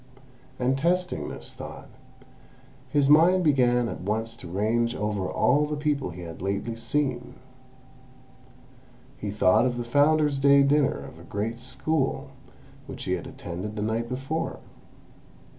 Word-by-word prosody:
And 130 +2 +1
testing 180 +3 0
this - - -8
thought, - - -9 1.0
his 145 -2 +2
mind 170 +5 +6
began 125 -5 +3
at - - -6
once 110 +4 -2
to 90 - -9
range 115 +6 0
over 105 -3 -2
all 150 +3 +2
the 150 - -2
people 145 -4 -1
he 90 +1 -9
had 85 -1 -9
lately 100 +4 -2
seen. 125 +1 -2 1.8
He 105 - -4
thought 100 +3 +4
of 120 -1 -2
the 120 - -2
Founder's 145 +3 +3
Day 140 0 +6
dinner 140 0 +3
of - - -12
a - - -12
great 110 +3 -3
School, 135 +3 -1 0.6
which - - -7
he - - -3
had - - -2
attended 90 +5 -6
the 105 - -2
night 115 +2 -1
before. 135 +6 -3
125 Hz, 140 wpm, -26 LUFS, 110-145 Hz, 1.8 s, mind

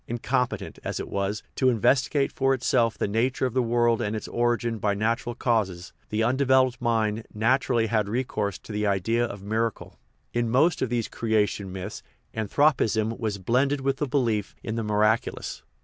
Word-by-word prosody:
Incompetent, 125 +2 -2
as - - -3
it - - -4
was, 100 +2 -2
to 130 - +1
inves 130 +2 +3
tigate 140 -2 +1
for 135 0 +2
itself 115 -2 +1
the - - 0
nature 120 +5 0
of 125 - -2
the 130 - +2
world 120 -1 +2
and 105 +1 -1
its 110 - -5
origin 120 -1 0
by 100 -1 +1
natural 115 +3 -1
causes, 100 -8 -1 0.2
the 110 +1 0
undeveloped 130 0 +3
mind 115 -2 0
naturally 120 +1 +2
had 110 -2 0
recourse 105 -5 -2
to - - -12
the 105 0 -1
idea 100 +5 +1
of 100 -4 -5
miracle. 110 +2 -2 0.3
In 120 -1 0
most 145 +7 +3
of 130 - 0
these 120 -2 -1
creation 105 -3 0
myths 95 +2 -6 0.3
anthropism 110 -1 +1
was 110 -4 -2
blended 130 +8 +1
with 135 0 0
the 145 - -1
belief 115 -7 0
in 110 - -3
the 115 - -2
miraculous. 105 +1 0
115 Hz, 175 wpm, -26 LUFS, 105-125 Hz, 0.3 s, inves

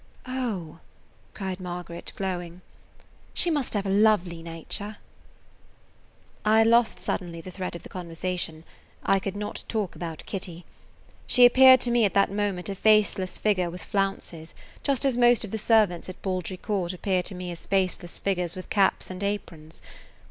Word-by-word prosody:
"Oh!" 220 -11 -4 0.6
cried 190 -2 -4
Margaret, 175 -1 -6
glowing, 180 -2 -4 0.7
"she 350 - +4
must 285 -7 0
have 205 -1 0
a - - -1
lovely 195 -5 +3
nature!" 170 +6 -4 1.5
I 220 +1 +5
lost 230 +1 +4
suddenly 170 -3 -3
the 185 +3 -9
thread 185 -1 -5
of 170 - -9
the - - -10
conversation. 170 -2 -4 0.4
I 195 - +3
could 195 0 -4
not 210 0 -5
talk 210 -7 -2
about 165 -1 -6
Kitty. 180 -3 -6 0.6
She 250 - +7
appeared 260 +1 +8
to 240 - +1
me 240 -1 +4
at 200 - +1
that 200 -1 +4
moment 200 -3 -2
a 200 - -2
faceless 205 -2 +2
figure 185 -5 +1
with 180 +1 -8
flounces, 195 -5 -3 0.3
just 280 -1 +1
as 265 -3 +2
most 240 -1 +5
of 210 - -6
the 220 - -3
servants 210 -6 +2
at 185 - -9
Baldry 185 -1 -3
Court 190 -3 -2
appear 185 0 0
to 185 - -5
me 180 0 -5
as 170 - -10
faceless 185 -3 -1
figures 180 -2 -1
with 185 - -9
caps 195 -2 +2
and 185 +1 -7
aprons. 170 -6 -5
190 Hz, 160 wpm, -26 LUFS, 175-215 Hz, 1.5 s, appeared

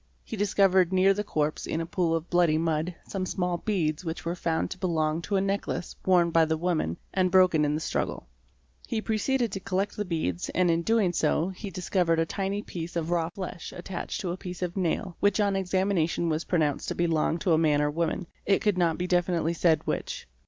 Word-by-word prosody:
He - - -6
discovered 195 -3 +3
near 190 +1 +4
the 205 +1 -2
corpse 155 -6 -1
in 160 - -1
a 165 - -2
pool 170 -1 0
of 165 +1 -3
bloody 175 -3 +3
mud 160 +1 -1
some 195 -2 -3
small 180 -1 -1
beads 165 -7 -1
which 165 -1 -5
were 170 - -1
found 165 -2 -1
to 185 - -6
belong 160 -3 0
to 200 +4 -2
a 190 - +3
necklace 195 -2 -2
worn 175 -2 +4
by 165 0 +5
the 160 0 0
woman 160 - -1 0.2
and 185 -1 +2
broken 185 -4 +5
in 150 0 +1
the 155 - -3
struggle. - - -2 0.6
He 225 - -1
preceded 225 +2 0
to 195 - -3
collect 195 +2 -2
the 210 - -2
beads 160 - -2
and 180 -2 +3
in 165 0 +1
doing 210 -2 +2
so, 160 +2 +1
he 190 +2 -7
discovered 180 -2 0
a 165 - +2
tiny 195 +4 -2
piece 170 0 -6
of 165 0 -2
raw 165 -2 +1
fleshattached 180 -1 -6
to 180 -4 -2
a 175 - -4
piece 180 -1 -6
of 175 -1 -3
nail, 185 0 -1
which 205 +1 +2
on 200 -1 +2
examination 185 -3 0
was 160 +1 -1
pronounced 155 -5 0
to - - -2
belong 165 -1 +1
to 175 0 +1
a 160 - +4
man 150 -3 +3
or 150 0 +2
a - - -3
woman, 165 +3 -1 0.2
it 200 +2 +2
could 205 -4 +2
not 165 -2 +2
be 180 - -2
definitely 175 -2 +1
said 160 -2 +2
which. - - -3
175 Hz, 215 wpm, -27 LUFS, 165-190 Hz, 0.6 s, by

